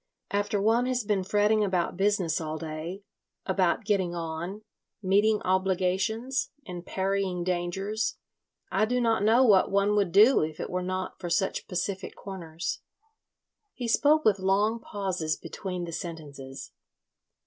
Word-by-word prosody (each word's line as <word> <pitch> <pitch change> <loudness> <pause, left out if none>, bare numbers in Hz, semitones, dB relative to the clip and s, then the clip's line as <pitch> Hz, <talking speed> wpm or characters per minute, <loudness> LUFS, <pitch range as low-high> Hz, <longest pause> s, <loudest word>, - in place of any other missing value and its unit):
After 205 +1 0
one 225 +5 +3
has 255 -2 0
been 205 -2 0
fretting 210 +2 +3
about 185 -4 0
business 195 -4 +1
all 155 0 -3
day, 160 +5 -6 0.4
about 190 +2 +1
getting 190 -4 +1
on, 170 +5 -5 0.4
meeting 205 +3 +3
obligations, 190 +7 0 0.2
and 180 -3 -7
parrying 190 -2 -1
dangers, 190 +5 -1 0.6
I 215 - +3
do 250 +3 0
not 230 -4 +2
know 225 +5 +5
what 205 -6 +5
one 200 +1 +2
would 200 -4 +2
do 215 +8 +6
if 155 0 -3
it - - -4
were 180 0 -1
not 185 +1 -4
for 175 - -4
such 190 +3 0
pacific 190 +2 -3
corners." 170 -4 -5 0.9
He 245 - -4
spoke 300 +6 +3
with 200 -3 +4
long 205 +4 +2
pauses 185 -8 -2
between 180 -3 -5
the 170 - -7
sentences. 145 -6 -7
190 Hz, 140 wpm, -28 LUFS, 175-210 Hz, 0.9 s, do